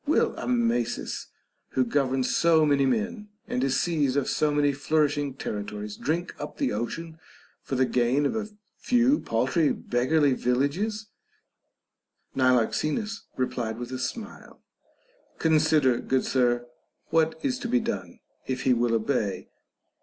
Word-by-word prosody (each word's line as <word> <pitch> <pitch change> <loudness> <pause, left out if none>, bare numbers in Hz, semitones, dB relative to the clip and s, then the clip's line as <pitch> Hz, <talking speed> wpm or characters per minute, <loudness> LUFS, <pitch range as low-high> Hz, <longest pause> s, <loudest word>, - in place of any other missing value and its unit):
Will 310 - +3
Amasis, 235 - -1 0.5
who 130 - +2
governs 130 0 0
so 160 -2 +4
many 140 -2 +3
men 130 - -2 0.2
and 125 - -1
is 135 -1 +1
seized 145 -6 +1
of 140 - +1
so 155 - +1
many 145 -1 +2 0.2
nourishing 145 -3 +2
territories, 105 -1 -5
drink 170 +3 -2
up - - -7
the 275 -3 0
ocean 160 +7 -4 0.4
for 135 - -4
the 130 0 +3
gain 125 +4 +1
of 140 - 0
a 215 -1 -2 0.3
few 250 +4 +3
paltry, 130 +7 +1
beggarly 140 +4 +1
villages 145 - 0 0.7
% - - -47
Niloxenus 150 - +1
replied 120 -3 -2
with 120 +1 -6
a 130 - -4
smile: 215 - -6 0.7
Consider, 155 -5 +3
good 130 -1 0
sir, 120 -2 +1 0.5
what 160 0 +2
is 255 -2 0
to 245 - -4
be 250 +1 +3
done, 95 - -5 0.3
if 130 -1 -2
he 130 - +4
will 120 -1 +1
obey. 110 -3 -1
140 Hz, 140 wpm, -26 LUFS, 125-165 Hz, 0.7 s, so